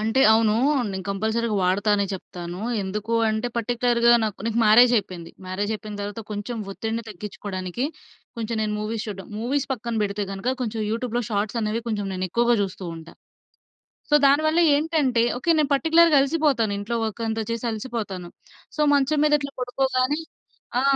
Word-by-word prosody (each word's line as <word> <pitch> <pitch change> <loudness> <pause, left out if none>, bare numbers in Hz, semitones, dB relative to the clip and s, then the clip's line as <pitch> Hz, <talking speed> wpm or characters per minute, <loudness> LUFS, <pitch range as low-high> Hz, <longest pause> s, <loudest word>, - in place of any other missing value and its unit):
అంటే 225 +5 +1
అవును. 220 -1 +3 0.4
నేను 190 -1 -5
కంపల్సరీగా 220 +3 -1
వాడతానే 200 +2 +2
చెప్తాను. 175 -1 -7 0.2
ఎందుకు 210 +4 -4 0.2
అంటే, 220 +2 -1
పర్టిక్యులర్‌గా 235 0 +2
నాకు 210 -3 -4
నాకు 230 0 0
మ్యారేజ్ 235 +3 +7
అయిపోయింది. 180 -5 -4 0.2
మ్యారేజ్ 195 +3 -2
అయిపోయిన 215 -1 -7
తర్వాత, 205 +3 -5
కొంచెం 210 +3 -4 0.2
ఒత్తిడిని 225 +3 -3
తగ్గించుకోవడానికి, 195 +1 -5 0.5
కొంచెం 230 0 -3
నేను 215 -1 -1
మూవీస్ 215 +1 -3
చూడ్డం. 195 -3 -7
మూవీస్ 265 +4 -1
పక్కన 235 -2 -4
పెడితే 205 0 -1
గనక, 230 +7 -2
కొంచెం 225 -2 -2
యూట్యూబ్‌లో 240 +1 -1
షార్ట్స్ 210 +2 -1
అనేవి 215 +2 -1
కొంచెం 195 -4 -2
ఎక్కువగా 235 +5 +2
చూస్తూ 190 -1 -5
ఉంటా. 165 0 -12 1.0
సో, - - +7
దాని 280 +2 +4
వల్ల 315 +2 +2 0.2
ఏంటంటే 290 -6 +1 0.2
ఓకే, 335 - -3
నేను 295 - +1
పర్టిక్యులర్‌గా 325 +1 +5
అలిసిపోతాను 275 -7 +1
ఇంట్లో 230 +4 -2
వర్క్ 220 +1 -5
అంతా 220 0 -1
చేసి 230 +1 -3
అలిసిపోతాను. 215 -6 -5 0.5
సో, - - +1
మంచం 285 +2 +2
మీద 300 - +2
ఇట్లా 280 -1 -6
పడుకోగానే 255 +3 0 0.6
ఆ! - - +1
225 Hz, 155 wpm, -24 LUFS, 205-250 Hz, 1.0 s, మ్యారేజ్